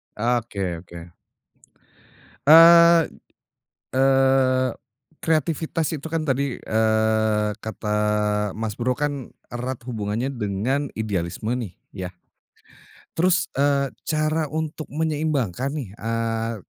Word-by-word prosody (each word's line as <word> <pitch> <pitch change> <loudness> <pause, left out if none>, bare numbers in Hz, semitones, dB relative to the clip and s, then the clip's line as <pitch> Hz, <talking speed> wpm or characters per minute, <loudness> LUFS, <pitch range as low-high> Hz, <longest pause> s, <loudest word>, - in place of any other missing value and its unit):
Oke 110 -6 -1
oke. 85 -1 -12 1.4
Eee 170 +1 +8 1.0
eee, 130 -1 +3 0.5
kreativitas 160 0 0
itu 155 0 -5
kan 160 -1 -2
tadi, 140 -2 -1
eee, 110 -1 +1
kata, 105 -1 -3 0.6
Mas, 110 -1 -3
bro 125 +3 -1
kan, 145 -3 -3 0.2
erat 125 0 -5
hubungannya 115 +2 -3
dengan 120 +6 -1
idealisme 105 +1 -2
nih, 120 -8 -3 0.2
ya. 90 -1 -5 1.0
Terus, 180 +2 +1
eee, 140 -1 +1 0.2
cara 155 0 0
untuk 155 +1 -4
menyeimbangkan 145 - -1
nih 130 -9 -4
eee, 115 +1 -2
130 Hz, 95 wpm, -23 LUFS, 110-150 Hz, 1.4 s, Eee